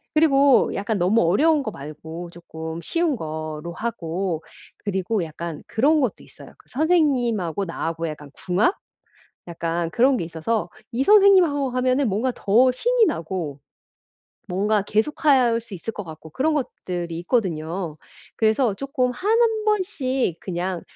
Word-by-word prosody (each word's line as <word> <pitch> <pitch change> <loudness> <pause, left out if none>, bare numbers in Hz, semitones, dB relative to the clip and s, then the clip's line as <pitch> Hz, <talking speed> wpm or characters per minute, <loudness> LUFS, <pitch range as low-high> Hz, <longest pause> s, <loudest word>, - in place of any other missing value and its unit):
그리고 280 -3 +5
약간 205 +2 -2
너무 195 +6 +3
어려운 290 - +3
거 235 - -3
말고 160 +1 -8
쪼끔 160 -1 -7
쉬운 335 - 0
거로 155 -2 -5
하고 180 -6 -3 0.4
그리고 195 0 -1
약간 165 0 -6
그런 295 +7 +3
것도 250 -7 -2
있어요. - - -14
그 - - -24
선생님하고 245 - +1
나하고 165 -1 -3
약간 150 -2 -8
궁합? 190 - +1 0.7
약간 170 0 -2
그런 255 +4 +3
게 175 - -2
있어서 170 +4 -2 0.2
이 250 +2 0
선생님하고 370 -8 +5
하면은 255 +1 +1
뭔가 220 +7 0
더 240 +6 +4
신이 475 - +2
나고 165 - -3 0.9
뭔가 205 +3 +1
계속할 240 +2 +2
수 225 -3 -9
있을 220 +6 -6
것 205 - -6
같고 160 -2 -11
그런 305 - +1
것들이 175 - -4
있거든요. 170 - -2 0.4
그래서 220 +1 +2
쪼끔 260 +2 -1
1 440 - +1
번씩 275 - 0
그냥 180 -1 -3
210 Hz, 285 characters per minute, -23 LUFS, 170-270 Hz, 0.9 s, 그리고